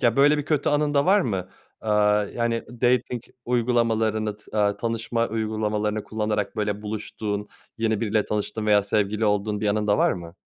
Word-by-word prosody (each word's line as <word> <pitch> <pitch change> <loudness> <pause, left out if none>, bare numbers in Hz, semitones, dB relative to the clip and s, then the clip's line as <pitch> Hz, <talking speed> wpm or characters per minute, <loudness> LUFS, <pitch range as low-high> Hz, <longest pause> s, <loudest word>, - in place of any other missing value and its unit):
Ya, 120 0 +2
böyle 145 +2 +5
bir 145 - -2
kötü 150 -2 +1
anın 145 0 +1
da 140 0 +4
var 205 +2 +5
mı? 95 - -2 0.3
Aaa, 105 -1 +3
yani, 115 +2 -2 0.2
dating 125 -1 +1 0.2
uygulamalarını 115 -3 +1
t 105 - -24
aaa, 100 -1 +2
tanışma 115 0 -1
uygulamalarını 110 -1 -1
kullanarak, 105 -2 -2
böyle, 105 -1 -2
buluştuğun, 105 -1 -4 0.3
yeni 110 -2 0
biriyle 110 -2 +1
tanıştığın 105 +1 -3
veya 105 -1 +5
sevgili 105 +1 0
olduğun 105 0 0
bir 105 - 0
anın 105 0 0
da 105 - +3
var - - +4
mı? 85 -2 -8
110 Hz, 170 wpm, -24 LUFS, 105-115 Hz, 0.3 s, böyle